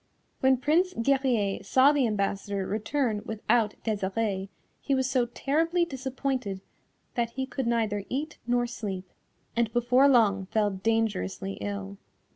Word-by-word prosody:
When 265 0 +4
Prince 330 +8 +2
Guerrier 240 -6 +1
saw 260 +7 +5
the 285 -4 +2
ambassador 200 -1 -1
return 220 +2 -1
without 220 0 +1
Desirée, 200 -2 -1 0.3
he 275 - +1
was 260 -1 +1
so 255 -2 +1
terribly 325 +8 +1
disappointed 260 - -3 0.5
that 235 -1 0
he 265 +1 -2
could 260 -1 -3
neither 220 -4 0
eat 295 +4 -3
nor 245 0 +2
sleep, 200 -6 -5 0.5
and 235 -2 +1
before 245 +3 +4
long 205 -7 +3
fell 210 0 +1
dangerously 190 - -1
ill. 100 -1 -5
230 Hz, 130 wpm, -28 LUFS, 200-265 Hz, 0.5 s, saw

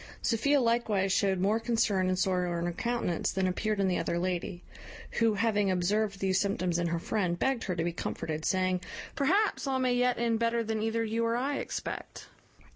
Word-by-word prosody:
Sophia 280 +5 +2
likewise 230 -5 +1
showed 195 -2 +2
more 205 +4 +2
concern 225 -5 +1
and 185 0 +1
sorrow 180 -2 0
in 170 - -2
her 175 - -1
countenance 235 -2 -1
than 190 -1 0
appeared 205 +3 -1
in 195 - +2
the 180 - +1
other 170 - -1
lady; 175 0 -2 0.6
who, 225 -2 +3
having 210 -2 +1
observed 195 +3 +1
these 190 -1 +1
symptoms 185 -4 0
in 170 - 0
her 170 0 -1
friend, 180 -1 -1
begged 260 +2 0
her 185 - -2
to 165 - -1
be 170 0 -1
comforted, 155 -2 -4
saying, 185 -1 +1 0.3
"Perhaps 380 +3 +1
all 265 -1 +1
may 255 -1 +1
yet 250 0 +2
end 230 -1 +1
better 230 0 +1
than 220 -1 -2
either 225 +1 0
you 225 +1 -1
or 230 0 +1
I 275 +3 -1
expect." - - -6
205 Hz, 200 wpm, -30 LUFS, 185-230 Hz, 0.6 s, who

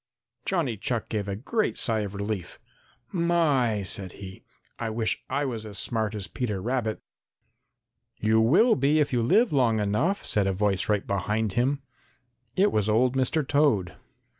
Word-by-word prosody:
Johnny 160 - 0
Chuck 115 +3 -3
gave 105 -2 -2
a 100 - -2
great 210 - -1
sigh 115 -2 +2
of 100 -1 -4
relief. 100 -2 -4 0.5
"My," 150 - +1
said 95 -1 -1
he, 95 -1 -10 0.4
"I 115 - -2
wish 110 0 -2
I 140 +2 0
was 115 -5 -4
as 105 -2 -5
smart 110 0 0
as 100 -3 -3
Peter 105 -2 -3
Rabbit!" 115 +1 -2 1.1
"You 110 +1 +3
will 175 - +5
be 140 +3 +2
if 145 -3 +1
you 120 - +2
live 215 - +3
long 120 -5 +3
enough," 115 - 0
said 100 -2 +1
a 95 - +1
voice 100 0 0
right 105 -2 +1
behind 105 +1 -1
him. 135 +5 0 0.7
It 200 +2 +3
was 105 0 +1
old 125 +4 +2
Mr. 135 +2 0
Toad. 140 - +2
110 Hz, 165 wpm, -26 LUFS, 105-140 Hz, 1.1 s, will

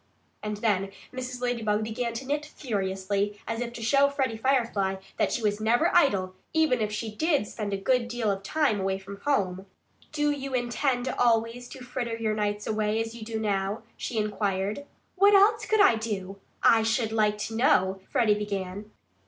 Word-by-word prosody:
And 210 0 -3
then 205 -3 +1 0.2
Mrs. 255 -1 -5
Ladybug 220 -4 0
began 230 +2 -3
to 240 +4 -5
knit 290 +2 -1
furiously, 200 -6 -2
as 225 0 -2
if 240 -1 -3
to 235 - -7
show 275 +5 +4
Freddie 265 -5 -1
Firefly 225 -6 +1 0.2
that - - +1
she 240 - -2
was 210 0 0
never 240 +10 +2
idle, 195 - +3 0.2
even 310 -7 +3
if 210 -1 0
she 215 +1 -4
did 300 0 +1
spend 210 -1 -5
a 195 - 0
good 235 +4 +1
deal 240 -3 -1
of 195 0 -3
time 250 0 +1
away 190 0 0
from 195 +1 -9
home. 195 -9 0 0.4
"Do 295 -1 +1
you 275 -2 -3
intend 245 +1 0
always 235 0 +1
to 260 -1 -10
fritter 240 -2 -3
your 220 -1 0
nights 210 -1 -1
away 215 0 0
as 225 0 -3
you 235 - -10
do 220 0 -4
now?" 205 0 -1
she 235 - -4
inquired. 210 +3 -1 0.3
"What 400 +2 +6
else 420 +3 +4
could 435 -1 +4
I 235 - +6
do? 200 -3 -4 0.2
I 225 - +6
should 225 0 0
like 210 -1 +2
to 220 +1 -4
know 190 -5 +3
" - - -34
Freddie 215 -3 +3
began. 205 -1 -4
225 Hz, 185 wpm, -27 LUFS, 205-250 Hz, 0.4 s, What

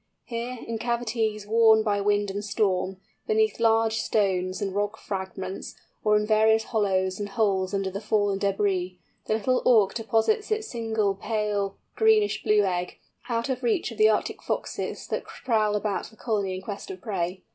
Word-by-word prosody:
Here, 240 +1 -4
in 230 -1 -4
cavities, 225 -3 -1
worn 220 0 +5
by 205 -2 +1
wind 205 0 +1
and 200 +1 -4
storm, 190 -2 0 0.3
beneath 435 - +2
large 225 -1 +3
stones 185 -3 0
and 195 -2 -2
rock 205 +2 -1
fragments, 190 -1 -5 0.3
or 210 -1 +4
in 210 - 0
various 220 +1 +4
hollows 190 -4 0
and 205 0 -3
holes 195 -3 +1
under 195 -1 -1
the 200 +2 -5
fallen 205 -2 +1
débris, 195 -2 0 0.3
the 215 - +2
Little 250 +4 +1
Auk 220 -6 +4
deposits 225 - +1
its 435 0 -1
single 220 - 0
pale 205 -1 -2 0.2
greenish 440 -2 +3
blue 210 -1 +3
egg, 180 -2 -2 0.3
out 230 +1 0
of 260 -1 -2
reach 240 -1 0
of 225 - -10
the 215 0 +7
Arctic 215 - -1
foxes - - -3
that - - -3
prowl 215 -4 0
about 210 -1 -1
the 220 - -18
colony 205 -5 -1
in 185 - -7
quest 205 - -6
of 385 - -7
prey. 185 -4 -3
210 Hz, 170 wpm, -26 LUFS, 195-225 Hz, 0.3 s, the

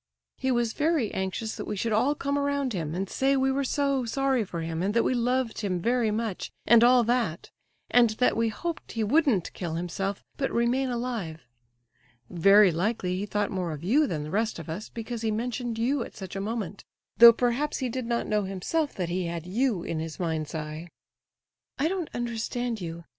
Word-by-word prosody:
He 265 - 0
was 240 -3 +1
very 300 -7 +1
anxious 190 +4 -3
that - - -5
we - - -2
should 225 +3 -1
all 255 +7 +2
come 280 -1 -2
around 280 -3 0
him, 160 -4 -3
and 195 +2 -2
say 270 +6 +1
we 265 0 +2
were 275 +1 0
so 275 -1 0
sorry 265 +1 +1
for 170 -4 -5
him, 165 0 -3
and 200 +4 -1
that 230 - +4
we - - +1
loved 250 -1 0
him 185 -4 -1
very 235 +3 +1
much, 215 -2 -2 0.2
and 235 0 +7
all 245 0 +6
that; 230 -8 -1 0.4
and 240 -1 +6
that 220 +4 +1
we 230 0 +1
hoped 335 +9 -5
he 225 - -1
wouldn't 240 - +2
kill 170 -3 -4
himself, 190 +4 -3
but 270 - 0
remain 245 +3 +1
alive. 235 -10 -3 0.9
Very 195 +3 +6
likely 180 +1 -1
he 200 +3 -3
thought 205 0 -1
more 180 -4 -2
of 150 +1 -8
you 280 - +3
than 155 -8 -3
the 150 - -7
rest 220 +4 0
of 165 -2 -8
us, 180 +7 -5
because 230 0 -6
he 225 - 0
mentioned 235 +1 -2
you 255 +4 +1
at - - -11
such 190 -1 -7
a 195 - -2
moment, 205 -2 -4 0.3
though 235 0 +11
perhaps 245 +5 0
he 260 - -1
did 250 0 -4
not 235 0 0
know 210 0 +1
himself 240 - -2
that 180 -3 -2
he 180 0 -1
had 170 -1 -5
you 210 -1 0
in 165 -1 -3
his 160 0 -6
mind's 160 -2 -2
eye." 155 +2 -5 0.9
"I 285 - +2
don't 360 -2 -2
understand 240 -1 -2
you. 170 0 -6
225 Hz, 205 wpm, -27 LUFS, 185-250 Hz, 0.9 s, though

